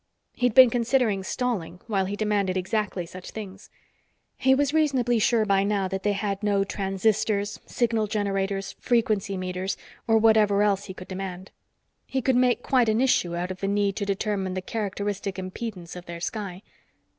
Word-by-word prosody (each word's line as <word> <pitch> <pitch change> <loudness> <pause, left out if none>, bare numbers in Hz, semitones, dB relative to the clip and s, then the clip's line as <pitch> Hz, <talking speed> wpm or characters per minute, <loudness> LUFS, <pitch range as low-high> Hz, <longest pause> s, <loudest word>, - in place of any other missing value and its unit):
He'd 245 -3 0
been 255 -2 +9
considering 235 -4 +1
stalling 190 -6 -2
while 195 -4 0
he 200 +2 -3
demanded 205 -3 0
exactly 190 -1 -1
such 180 +2 -10
things. 195 -3 -9 0.7
He 265 0 +3
was 285 +1 +1
reasonably 260 -7 +2
sure 220 0 +3
by 195 -1 +3
now 200 -1 0
that 190 0 -3
they 205 +1 +1
had 200 0 -2
no 205 -2 +2
transistors, 200 +1 0
signal 230 -3 0
generators, 195 -2 -1
frequency 215 -5 +1
meters 185 +1 -3 0.3
or 225 -1 +5
whatever 215 -2 +4
else 200 -1 +1
he 190 - -8
could 185 - -10
demand. 190 -1 -6 0.6
He 265 - -1
could 260 0 +1
make 245 -1 +3
quite 250 -4 +3
an 220 +1 +2
issue 215 -9 +2
out 180 +2 -2
of 185 - -7
the 195 - -2
need 200 0 +1
to 200 - -1
determine 195 -2 -1
the 185 - -2
characteristic 200 -2 -3
impedance 185 -2 -6
of 180 0 -9
their 170 0 -6
sky. 195 0 -5
205 Hz, 170 wpm, -26 LUFS, 190-225 Hz, 0.7 s, been